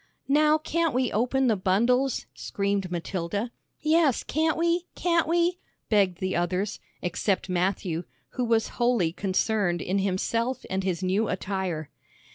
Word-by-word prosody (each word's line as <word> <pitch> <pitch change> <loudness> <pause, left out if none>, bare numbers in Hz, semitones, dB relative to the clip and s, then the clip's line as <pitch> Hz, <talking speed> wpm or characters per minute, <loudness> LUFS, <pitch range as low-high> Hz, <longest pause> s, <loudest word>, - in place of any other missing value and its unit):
"Now 300 +2 +4
can't 330 -1 0
we 255 -1 +1
open 250 +5 +1
the 230 -4 +3
bundles?" 235 +8 +2
screamed 200 -2 -2
Matilda. 180 +5 -3 0.3
"Yes, 310 -4 +3
can't 315 +2 0
we? 340 +1 +1
can't 335 -2 +2
we?" 345 +2 +2 0.3
begged 195 -5 +3
the 185 0 -2
others, 185 +4 -1 0.2
except 185 +2 -1
Matthew, 180 -2 -1 0.2
who 250 - -3
was 230 -1 +2
wholly 240 -9 +3
concerned 195 -1 0
in 190 +4 -1
himself 230 +6 -1
and 190 0 0
his 185 -1 -1
new 195 +4 +1
attire. 185 -5 -3
205 Hz, 135 wpm, -26 LUFS, 185-265 Hz, 0.3 s, Now